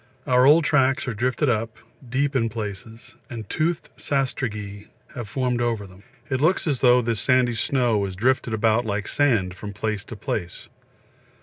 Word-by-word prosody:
Our 125 +1 +4
old 155 +3 +6
tracks 135 -1 +2
are 125 - -1
drifted 130 +7 0
up, 115 -2 -1 0.3
deep 140 +3 0
in 115 -3 +2
places, 110 0 -7 0.2
and 115 -5 -7
toothed 165 -2 -1
sastrugi 110 -8 -3 0.3
have 120 -4 -6
formed 125 0 -1
over 115 -4 -1
them. 95 0 -15 0.3
It 130 -1 -1
looks 180 +6 +2
as 145 -6 0
though 125 -1 +5
this 115 -2 -1
sandy 125 +2 +3
snow 120 -1 +1
was 100 -2 -3
drifted 120 +2 +1
about 110 +2 +2
like 105 -2 -3
sand 115 -11 +1
from 100 +3 -8
place 105 0 -3
to 115 - -8
place. 90 -3 -5
120 Hz, 170 wpm, -23 LUFS, 105-130 Hz, 0.3 s, old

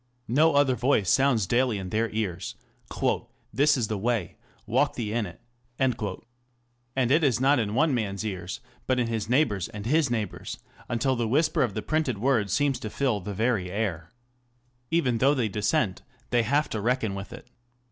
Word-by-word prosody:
No 150 +6 +4
other 140 -2 +4
voice 120 -5 +2
sounds 130 -6 +3
daily 120 +2 +1
in 95 -2 -6
their 110 +1 +1
ears, 95 -5 -3 0.5
" - - -3
This 145 +1 +4
is 120 -4 0
the 105 -2 -2
way, 115 -3 -1 0.3
walk - - +1
ye 110 -3 -2
in 115 -3 0
it." 90 - -12 0.4
And 120 +1 -4
it 155 +3 +4
is 130 -5 +3
not 135 +1 +4
in 105 -2 -1
one 155 +2 +3
man's 105 -3 -2
ears, 95 -3 -5 0.3
but 130 -1 +2
in 120 - +2
his 115 -2 -3
neighbour's 120 - +2
and 105 -1 -8
his 150 +3 +2
neighbour's, 110 -5 -3 0.3
until 130 +3 +1
the 120 -2 -1
whisper 155 +7 +2
of 100 - 0
the 110 - -3
printed 155 -7 0
word 110 -3 +1
seems 140 +6 +1
to 110 - -5
fill 125 -2 0
the 100 +1 -6
very 110 -4 0
air. 90 -5 -3 0.8
Even 130 -9 +1
though 140 +4 +4
they 120 -5 +1
dissent, 105 -1 0 0.3
they 120 -1 +4
have 140 +7 +1
to 110 - -2
reckon 115 -2 0
with 95 +2 -7
it. 120 +1 -10
120 Hz, 185 wpm, -27 LUFS, 105-130 Hz, 0.8 s, No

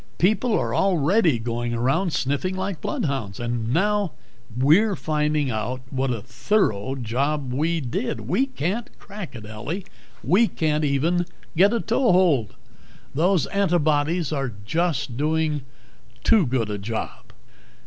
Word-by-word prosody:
People 215 +5 +2
are - - -1
already 175 - +3
going 120 +1 -2
around 135 +10 +1
sniffing 145 +8 -1
like 190 -3 -3
bloodhounds. 130 -9 -2
And 120 -1 -2
now 205 +3 +1 0.4
we're 175 +11 +4
finding 150 -3 0
out 115 +4 -3
what 135 0 0
a 115 -4 -2
thorough 125 - 0
job 135 +3 -1
we 160 +5 +1
did. 120 -2 -3
We 185 - +1
can't 210 - -3
crack 200 -8 -9
it, 110 -3 -8
Ellie. 130 - -5 0.4
We 220 +6 +4
can't 155 -4 0
even 165 +5 +1 0.3
get 195 +5 +5
a 235 - +1
toe 235 +2 +2
hold. 155 - +3 0.6
Those 175 +2 +2
antibodies 165 -4 +1
are 135 -5 -2
just 160 -3 -1
doing 155 0 0 0.6
too 205 -9 +4
good 120 -4 0
a 105 - -3
job." 110 +3 -5
150 Hz, 135 wpm, -24 LUFS, 125-185 Hz, 0.6 s, get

